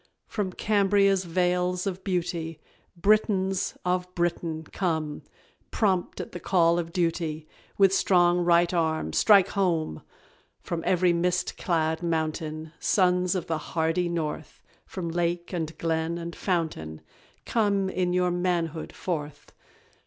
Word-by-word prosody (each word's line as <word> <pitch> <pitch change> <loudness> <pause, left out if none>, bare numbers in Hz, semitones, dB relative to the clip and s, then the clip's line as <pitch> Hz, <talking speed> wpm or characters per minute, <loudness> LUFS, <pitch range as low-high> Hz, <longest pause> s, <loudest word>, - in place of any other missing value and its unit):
From 200 -4 -3
Cambria's 195 -1 +2
vales 180 +1 0
of 190 -1 -4
beauty, 170 -4 -2 0.4
"Britons" 195 -1 +1
of 180 0 0
Britain, 170 -2 -1
come, 160 -3 -2 0.5
Prompt 190 -5 0
at - - -6
the 175 - -6
call 170 -1 +3
of 165 -1 -4
duty, 165 -3 -1 0.3
With 195 -1 +5
strong 175 -2 +4
right 175 0 +3
arm 160 -2 0
"strike 200 -4 +5
home!" 170 - 0 0.6
From 170 -1 -3
every 180 -1 +3
mist 180 +1 0
clad 160 -2 0
mountain, 160 -1 -2
Sons 180 -1 +2
of 180 - -2
the 165 -3 -2
hardy 165 +3 -1
North, 160 -2 -4 0.2
From 180 -3 -5
lake, 175 +1 -2
and 160 -2 -3
glen, 165 0 -1
and 170 0 -6
fountain, 160 - -2 0.4
Come 200 -4 +1
in 185 -1 -1
your 180 0 +2
manhood 175 -3 -1
forth. 150 -5 -5
175 Hz, 125 wpm, -26 LUFS, 165-185 Hz, 0.6 s, With